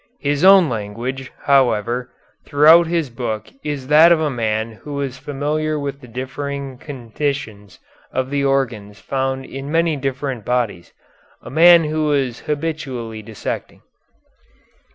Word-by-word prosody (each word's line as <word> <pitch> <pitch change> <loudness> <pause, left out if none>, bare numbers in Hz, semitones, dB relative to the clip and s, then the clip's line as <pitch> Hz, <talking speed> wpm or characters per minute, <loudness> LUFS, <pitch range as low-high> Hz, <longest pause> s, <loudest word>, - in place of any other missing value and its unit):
His 145 +1 0
own 190 -2 +8
language, 120 +3 -4
however, 125 -2 +2 0.3
throughout 160 +4 +6
his 165 -5 -1
book 110 -3 -4
is 145 -3 -4
that 155 +5 +7
of 170 - +5
a 155 -2 0
man 110 -2 -1
who 145 +7 -9
was 135 -2 -4
familiar 150 +2 -2
with 140 -1 -5
the 125 - -12
differing 135 +2 -5
conditions 120 -7 -5 0.3
of 130 +1 -2
the 140 -1 0
organs 115 -7 -1
found 135 +2 -2
in 135 +2 -7
many 165 -1 +2
different 135 -3 -3
bodies; 120 -8 -2 0.5
a - - -9
man 170 +3 +7
who 155 0 -1
was 135 -5 0
habitually 145 -8 -4
dissecting." 110 0 -6
135 Hz, 130 wpm, -20 LUFS, 120-150 Hz, 0.5 s, own